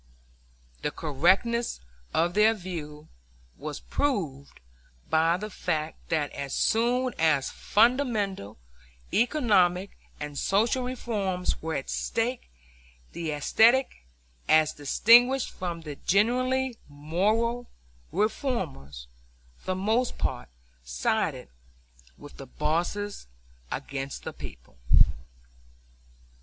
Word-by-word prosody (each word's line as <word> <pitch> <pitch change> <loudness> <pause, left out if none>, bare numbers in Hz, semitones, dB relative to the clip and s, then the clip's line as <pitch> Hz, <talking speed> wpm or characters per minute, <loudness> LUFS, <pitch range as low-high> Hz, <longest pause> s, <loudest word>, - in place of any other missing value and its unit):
The - - 0
correctness 185 - +1 0.3
of 170 +2 +1
their 215 +3 +4
view 160 -6 -7 0.5
was 150 0 -6
proved 160 - -2 0.5
by 165 +2 +3
the 210 +2 -6
fact 160 -4 -3
that 150 -3 0
as 140 -1 -5
soon 245 +3 +2
as 155 -4 +2
fundamental 215 - +1 0.6
economic 200 -8 +2 0.3
and 150 -1 -5
social 225 +6 +2
reforms 205 -8 -2
were 160 -1 -3
at 135 - -4
stake 240 +2 -2 0.6
the 165 -2 -4
aesthetic, 225 - +3 0.5
as 155 -1 +5
distinguished 240 - +4
from 175 -2 -5
the 150 -3 -8
genuinely 255 +5 +1
moral, 210 +12 0 0.4
reformers, 165 - -2 0.5
for - - -25
the 185 - 0
most 220 +6 0
part 65 - -3 0.3
sided - - -1 0.7
with 145 - -13
the 135 - -9
bosses 170 - -2 0.4
against 135 0 -5
the - - -6
people. - - -12
185 Hz, 95 wpm, -27 LUFS, 150-235 Hz, 0.7 s, as